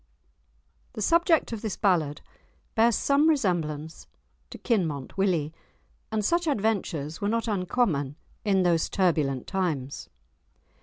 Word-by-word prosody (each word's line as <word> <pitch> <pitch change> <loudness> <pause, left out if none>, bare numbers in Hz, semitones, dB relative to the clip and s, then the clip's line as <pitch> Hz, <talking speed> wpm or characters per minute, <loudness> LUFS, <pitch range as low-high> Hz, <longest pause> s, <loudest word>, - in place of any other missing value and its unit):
The 215 - -6
subject 335 - +3
of 220 - -5
this 215 -3 -4
ballad 165 -8 +1 0.5
bears 230 0 +4
some 285 +3 +3
resemblance 165 - -1 0.4
to - - -9
Kinmont 165 - -1
Willie, 175 -6 0 0.6
and 215 -2 -1
such 340 +4 +1
adventures 195 - -1
were 205 - 0
not 230 +1 -1
uncommon 180 - 0 0.3
in 195 -3 +2
those 170 -2 +2
turbulent 150 -9 +1
times. 155 -9 -3
190 Hz, 115 wpm, -27 LUFS, 155-225 Hz, 0.6 s, bears